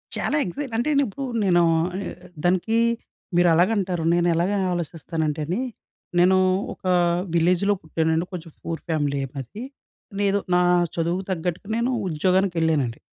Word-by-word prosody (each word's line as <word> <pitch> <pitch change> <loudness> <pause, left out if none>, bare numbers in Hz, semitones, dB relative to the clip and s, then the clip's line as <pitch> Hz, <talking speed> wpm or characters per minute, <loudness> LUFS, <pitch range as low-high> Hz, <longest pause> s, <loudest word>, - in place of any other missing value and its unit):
చాలా 300 - 0
ఎక్సైట్ 235 +7 -5
అంటే, 240 +6 0 0.2
ఇప్పుడు 270 +6 -5 0.2
నేను 175 -2 +4 0.2
ఆహ్, 185 +2 -4 0.4
దానికి 185 +5 +2 0.6
మీరు 175 0 +5
అలాగ 175 +4 +4
అంటారు, 180 -4 -1
నేను 175 0 +2
ఎలాగ 175 +4 +1 0.2
ఆలోచిస్తానంటే 160 -2 -3
అండి. 180 +9 -2 0.6
నేను 185 +2 +5 0.4
ఒక - - -19 0.5
విలేజ్‍లో 180 +4 +3
పుట్టానండి. 160 +1 0
కొంచెం 165 -2 -7
పూర్ 165 -1 -4
ఫ్యామిలీయే 145 -3 0
మాది. 135 - -7
ఏదో 235 -6 -14
నేను, 200 0 +2 0.2
నా 180 - +4 0.3
చదువుకు 170 +3 -1
తగ్గట్టుగా 180 +2 -3
నేను 240 +2 +1 0.2
ఉద్యోగానికి 185 +3 +1
వెళ్ళానండి. 145 -8 +1
175 Hz, 135 wpm, -23 LUFS, 160-195 Hz, 0.6 s, మీరు